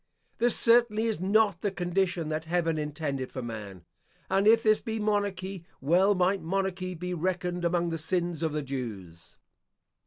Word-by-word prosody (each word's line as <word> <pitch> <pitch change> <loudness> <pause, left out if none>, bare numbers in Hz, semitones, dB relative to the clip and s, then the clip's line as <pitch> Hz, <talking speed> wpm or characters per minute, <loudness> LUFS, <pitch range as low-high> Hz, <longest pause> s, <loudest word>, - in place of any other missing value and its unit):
This 240 +1 +4
certainly 230 -2 +4
is 220 -5 -1
not 200 -1 +2
the 205 - 0
condition 175 -3 -1
that 155 +1 -3
heaven 165 -1 0
intended 145 -3 -3
for 130 - -5
man; 105 -6 -7 0.5
and 195 +2 +3
if 225 +1 +6
this 215 -1 +4
be 225 -2 -4
monarchy, 200 -3 -2 0.2
well 180 +8 +3
might 185 +2 +1
monarchy 185 +1 -2
be 180 +2 -4
reckoned 180 0 -2
among 170 0 +1
the 165 - -3
sins 170 0 -1
of 160 -1 0
the 150 0 -2
Jews. 105 -11 -7
180 Hz, 160 wpm, -28 LUFS, 155-195 Hz, 0.5 s, if